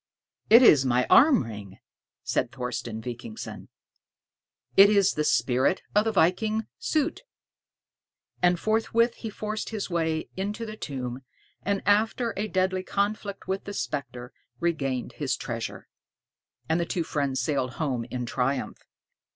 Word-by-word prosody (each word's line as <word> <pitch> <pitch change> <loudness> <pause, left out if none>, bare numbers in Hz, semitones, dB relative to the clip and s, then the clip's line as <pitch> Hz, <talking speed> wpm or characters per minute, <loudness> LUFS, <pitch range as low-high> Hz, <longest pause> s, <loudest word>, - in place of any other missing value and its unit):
"It 235 +4 +9
is 145 - +7
my 125 -1 +2
arm 270 -3 +7
ring," 105 -4 -9 0.5
said 125 - -1
Thorsten 120 -2 -5
Vikingsson; 120 -2 -7 1.1
"it 200 +1 +9
is 200 -2 +4
the 150 - -1
spirit 130 +4 +2
of 210 +1 +3
the 225 - +1
viking 215 +4 +2 0.2
Soté." 310 +1 0 1.2
And 175 -1 +3
forthwith 225 +3 +2
he 225 - -5
forced 215 +1 -4
his 210 -4 -4
way 160 -2 -1
into 205 +4 -3
the 215 -1 -7
tomb, 130 - -5 0.4
and, 200 -1 -1
after 220 +4 +2
a 210 +2 -2
deadly 185 -1 0
conflict 200 +1 -2
with 190 +1 -2
the 205 - -6
specter, 125 -3 -5 0.3
regained 135 -7 -1
his - - -2
treasure. - - -5 0.8
And 160 +1 +1
the 170 - 0
two 170 - -1
friends 140 -4 -1
sailed 130 -1 -1
home 130 -7 -2
in 125 +1 -4
triumph. 130 +2 -2
175 Hz, 135 wpm, -26 LUFS, 130-210 Hz, 1.2 s, It